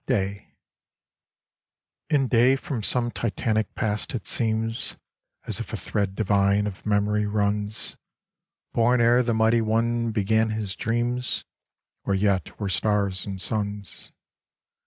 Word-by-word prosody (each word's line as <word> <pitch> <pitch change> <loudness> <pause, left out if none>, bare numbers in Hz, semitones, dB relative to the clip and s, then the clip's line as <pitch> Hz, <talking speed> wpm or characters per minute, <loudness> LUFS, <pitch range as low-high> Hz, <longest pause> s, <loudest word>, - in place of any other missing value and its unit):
27 100 -5 -1 1.6
IN 140 -4 +3
day 125 +2 +4
from 130 -3 -4
some 120 +3 +1
titanic 110 -2 -1
past 105 0 -1
it 110 - -4
seems 115 0 0 0.5
As - - -2
if - - -6
a - - -2
thread 100 -2 -2
divine 100 -1 +2
of 105 0 -6
memory 105 0 +1
runs; 105 0 -1 0.8
Born 120 +2 +3
ere 120 +1 +5
the 120 -2 0
Mighty 110 +1 +3
One 115 +1 +1
began 110 +1 +2
his 110 -3 -3
dreams, 120 +2 -1 0.6
Or 100 - 0
yet 95 -1 0
were 100 - -2
stars 100 0 +1
and 95 -1 -4
suns. 100 -1 -2
110 Hz, 125 wpm, -25 LUFS, 100-115 Hz, 1.6 s, ere